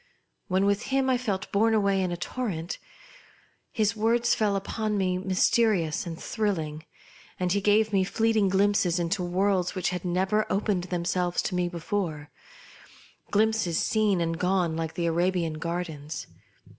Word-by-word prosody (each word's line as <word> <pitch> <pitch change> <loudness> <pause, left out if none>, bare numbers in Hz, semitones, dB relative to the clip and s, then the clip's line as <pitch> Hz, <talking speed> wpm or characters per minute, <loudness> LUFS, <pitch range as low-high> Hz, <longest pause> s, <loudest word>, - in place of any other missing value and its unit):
When 190 0 +2
with 200 +3 +1
him 265 -1 +1
I 255 - +3
felt 205 -6 -3
borne 220 +2 +3
away 200 -2 +2
in 185 -1 -1
a 175 - -3
torrent. 175 -2 -4 0.9
His 215 -1 +1
words 230 +2 +2
fell 210 -2 +1
upon 210 +2 -2
m(^ 185 -1 0
mysterious 185 -3 +2
and 165 -1 -6
thrilling, 160 -8 -2 0.5
and 180 -1 0
he 200 +2 +1
gave 215 +1 +3
mt 190 -1 +2
fleeting 220 -3 +2
glimpses 195 -2 +2
into 175 +3 -1
worlds 180 +1 0
which 185 - 0
had 180 -1 -3
nevei 190 +4 +1
opened 195 -3 0
themselves 175 0 -1
to - - -3
me 180 -1 0
before; 165 -3 -3 1.0
glimpses 215 -5 +1
seen 210 -5 +2
and 165 0 -1
gone 180 -3 +1
like 160 -1 -3
the 170 - -1
Arabian 170 -1 0
gardens. 165 -3 -4
185 Hz, 150 wpm, -27 LUFS, 175-210 Hz, 1.0 s, I